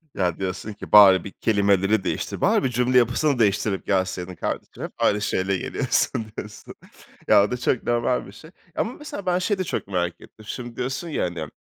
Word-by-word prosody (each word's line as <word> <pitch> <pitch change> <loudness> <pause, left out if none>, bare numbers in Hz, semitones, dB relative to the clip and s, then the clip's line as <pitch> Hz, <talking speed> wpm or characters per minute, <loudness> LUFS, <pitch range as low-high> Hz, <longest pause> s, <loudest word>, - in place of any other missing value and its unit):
Ya, 90 -3 0
diyorsun 95 +3 -4
ki, 105 - -11
"Bari 95 -4 +8
bir 100 - -8
kelimeleri 100 -1 +2
değiştir, - - -3
bari - - +3
bir 130 - +1
cümle 125 +1 +2
yapısını 125 +3 +2
değiştirip 100 -1 +1
gelseydin 95 -1 -1
kardeşim, - - -5
hep - - -5
aynı 105 0 +2
şeyle 95 -2 0
geliyorsun." 110 - -1
diyorsun. 105 0 -9 0.5
Ya, - - +6
o 105 - -2
da 125 - -1
çok 125 0 0
normal 120 +1 0
bir - - -11
şey 155 - -14 0.3
ya - - 0
ama, 230 - -3
mesela, 295 -10 -8
ben 180 0 +1
şeyi 200 +2 0
de 185 - -1
çok 165 - -4
merak 90 -2 -2
ettim. 110 - -16
Şimdi 120 +1 -7
diyorsun 135 +7 -4
ya, 150 - -1
hani, 85 -3 -4
105 Hz, 200 wpm, -23 LUFS, 95-125 Hz, 0.5 s, Bari